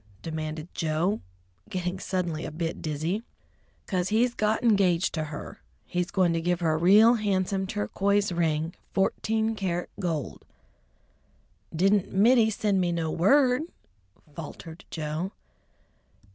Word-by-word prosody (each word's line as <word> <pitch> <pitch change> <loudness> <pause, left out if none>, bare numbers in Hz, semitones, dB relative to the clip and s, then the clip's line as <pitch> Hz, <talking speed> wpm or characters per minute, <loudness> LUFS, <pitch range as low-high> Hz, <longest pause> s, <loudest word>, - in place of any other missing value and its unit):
demanded 155 0 -4
Joe, 165 +6 0 0.5
getting 180 0 -3
suddenly 175 -5 -2
a - - -4
bit 165 +1 -4
dizzy. 160 +7 -2 0.6
"'Cause 185 -2 -1
he's 235 +3 +2
got 215 0 0
engaged 190 -6 +3
to 155 -1 -2
her. 150 -1 -8 0.2
He's 180 0 -2
going 185 -4 +2
to 165 - 0
give 175 +1 0
her 160 -2 +2
a - - +1
real 205 +8 +6
handsome 195 -3 0
turquoise 200 - 0
ring, 165 -1 0 0.2
fourteen 220 +3 +1
carat 180 -4 -2
gold." 165 -7 -3 1.3
"Didn't 195 +4 +2
Mittie 220 +3 +5
send 205 -2 +1
me 175 -1 +1
no 165 -2 -1
word?" 250 - +4 0.7
faltered 165 +1 -9
Joe. 160 +4 -3
180 Hz, 125 wpm, -27 LUFS, 165-205 Hz, 1.3 s, real